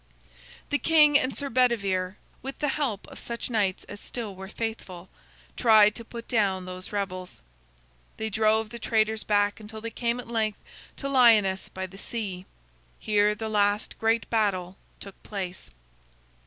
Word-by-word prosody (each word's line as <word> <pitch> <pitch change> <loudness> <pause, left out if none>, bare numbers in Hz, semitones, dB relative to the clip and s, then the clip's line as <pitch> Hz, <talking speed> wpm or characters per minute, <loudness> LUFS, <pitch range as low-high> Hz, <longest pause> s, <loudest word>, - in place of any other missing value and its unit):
The 290 - +2
king 305 -3 +5
and 260 +1 -2
Sir 285 - -2
Bedivere, 200 -7 +1 0.3
with 270 +2 -6
the 295 - 0
help 260 -9 -2
of - - -11
such 235 +1 -5
knights 200 -5 0
as 205 - -10
still 225 -3 -6
were 190 +1 -8
faithful, 195 -5 -5 0.5
tried 215 -3 +6
to 230 - -7
put 230 0 -9
down 195 -6 +1
those 185 0 -8
rebels. 185 -3 -4 0.8
They 220 0 -3
drove 220 +1 +2
the 235 - -7
traitors 220 -1 +1
back 205 0 +2
until 220 0 -8
they 230 +1 -5
came 235 +1 -1
at 250 - -8
length 220 -3 -1 0.4
to 275 - -3
Lyonnesse 225 -8 +4
by 190 0 -5
the 190 +1 -11
sea. 195 -6 -4 0.5
Here 210 0 +2
the 220 +1 -4
last 205 -1 +1
great 225 +1 +1
battle 195 -5 0 0.2
took 200 -1 -11
place. 185 - -5
215 Hz, 155 wpm, -27 LUFS, 195-230 Hz, 0.8 s, tried